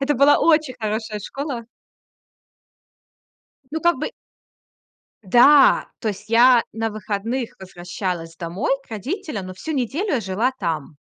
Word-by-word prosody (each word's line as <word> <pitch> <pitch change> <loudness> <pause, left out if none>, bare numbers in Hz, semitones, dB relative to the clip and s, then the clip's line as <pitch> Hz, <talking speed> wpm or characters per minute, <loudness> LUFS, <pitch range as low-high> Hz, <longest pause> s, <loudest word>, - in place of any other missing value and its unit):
Это 285 +2 +1
была 280 +3 +5
очень 305 -5 +3
хорошая 215 0 -3
школа. 265 +2 -5 2.1
Ну, 320 - -2
как 345 -5 +2
бы 305 - -2 1.1
Да, 265 +8 +6
то 225 - -3
есть 210 +1 -5
я 240 +1 +6
на 225 0 -2
выходных 215 +4 -4
возвращалась 175 -2 -5
домой 180 - -3
к - - -29
родителям, 245 - -4
но 185 - -7
всю 190 +12 -6
неделю 290 - -1
я 245 - +1
жила 205 +7 0
там. 160 -5 -4
230 Hz, 130 wpm, -22 LUFS, 190-275 Hz, 2.1 s, Да